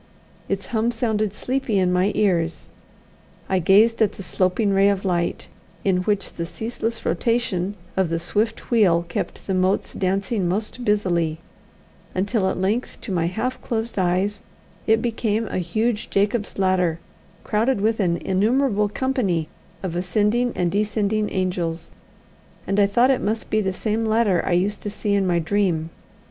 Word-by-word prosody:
Its 195 Hz, -1 st, -2 dB
hum 225 Hz, +2 st, 0 dB
sounded 220 Hz, -3 st, 0 dB
sleepy 245 Hz, 0 st, -1 dB
in 180 Hz, -1 st, +2 dB
my 185 Hz, +3 st, +2 dB
ears. 175 Hz, -6 st, 0 dB, 0.8 s
I 190 Hz, -, +1 dB
gazed 210 Hz, +7 st, +4 dB
at 215 Hz, -, +3 dB
the 195 Hz, -, -8 dB
sloping 185 Hz, +3 st, +1 dB
ray 195 Hz, +1 st, +5 dB
of 200 Hz, -1 st, -1 dB
light, 175 Hz, -2 st, -1 dB, 0.4 s
in 190 Hz, -2 st, +3 dB
which 200 Hz, +2 st, -1 dB
the 170 Hz, -, -4 dB
ceaseless 225 Hz, +2 st, -4 dB
rotation 205 Hz, -5 st, 0 dB, 0.2 s
of 190 Hz, -3 st, +1 dB
the 165 Hz, -, 0 dB
swift 215 Hz, +9 st, -2 dB
wheel 180 Hz, -7 st, +4 dB
kept -, -, -4 dB
the 195 Hz, -, -1 dB
motes 185 Hz, +1 st, +1 dB
dancing 195 Hz, 0 st, 0 dB
most 215 Hz, +6 st, -3 dB
busily, 175 Hz, -7 st, +1 dB, 0.8 s
until 200 Hz, +1 st, +1 dB
at -, -, -2 dB
length 205 Hz, +7 st, -1 dB
to 210 Hz, -, -6 dB
my 170 Hz, -2 st, +1 dB
half 225 Hz, +8 st, -3 dB
closed 225 Hz, -2 st, -2 dB
eyes 190 Hz, +3 st, 0 dB, 0.5 s
it 225 Hz, 0 st, +3 dB
became 225 Hz, -2 st, 0 dB
a -, -, -2 dB
huge 215 Hz, +6 st, -1 dB
Jacob's 205 Hz, +2 st, 0 dB
ladder, 185 Hz, -4 st, +2 dB, 0.5 s
crowded 225 Hz, +3 st, +1 dB
with 220 Hz, +2 st, +1 dB
an 175 Hz, -4 st, +2 dB
innumerable 210 Hz, +3 st, +1 dB
company 200 Hz, -, -1 dB, 0.3 s
of 180 Hz, -3 st, -3 dB
ascending 210 Hz, +7 st, +1 dB
and 175 Hz, -1 st, 0 dB
descending 210 Hz, +1 st, 0 dB
angels, 175 Hz, -3 st, -2 dB, 0.7 s
and 195 Hz, +1 st, 0 dB
I 200 Hz, -, +5 dB
thought 240 Hz, +6 st, +4 dB
it 260 Hz, -, +1 dB
must 220 Hz, +2 st, -2 dB
be 215 Hz, -, +3 dB
the 190 Hz, -2 st, 0 dB
same 220 Hz, +3 st, -1 dB
ladder 215 Hz, -5 st, +3 dB
I 185 Hz, -, 0 dB
used 195 Hz, +4 st, +1 dB
to 205 Hz, -, -4 dB
see 205 Hz, 0 st, -2 dB
in 195 Hz, -2 st, +2 dB
my 175 Hz, -1 st, +2 dB
dream. 170 Hz, -2 st, 0 dB
200 Hz, 160 wpm, -23 LUFS, 185-220 Hz, 0.8 s, ray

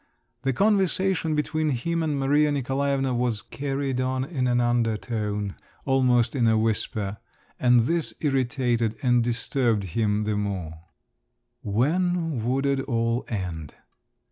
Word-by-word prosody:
The 135 Hz, -, 0 dB
conversation 190 Hz, -, +2 dB
between 155 Hz, +1 st, 0 dB
him 165 Hz, +6 st, -1 dB
and 150 Hz, -3 st, -1 dB
Maria 145 Hz, +2 st, +3 dB
Nikolaevna 135 Hz, -1 st, 0 dB
was 120 Hz, -3 st, -1 dB
carried 135 Hz, -2 st, -2 dB
on 130 Hz, 0 st, -1 dB
in 135 Hz, -4 st, -2 dB
an 120 Hz, 0 st, +2 dB
undertone, 110 Hz, -4 st, -1 dB, 0.3 s
almost 125 Hz, -3 st, +2 dB
in 120 Hz, -4 st, +2 dB
a 110 Hz, -1 st, +4 dB
whisper, 105 Hz, -2 st, -1 dB, 0.4 s
and 125 Hz, -1 st, +5 dB
this 165 Hz, +7 st, 0 dB
irritated 125 Hz, -5 st, 0 dB
and 125 Hz, -2 st, +3 dB
disturbed 120 Hz, -2 st, 0 dB
him 105 Hz, -2 st, +1 dB
the 105 Hz, 0 st, -1 dB
more…. 100 Hz, -6 st, -3 dB, 0.9 s
When 160 Hz, -, 0 dB
would 130 Hz, +4 st, 0 dB
it 140 Hz, -1 st, +1 dB
all 115 Hz, -2 st, -1 dB
end? 90 Hz, -, -5 dB
125 Hz, 125 wpm, -25 LUFS, 115-140 Hz, 0.9 s, and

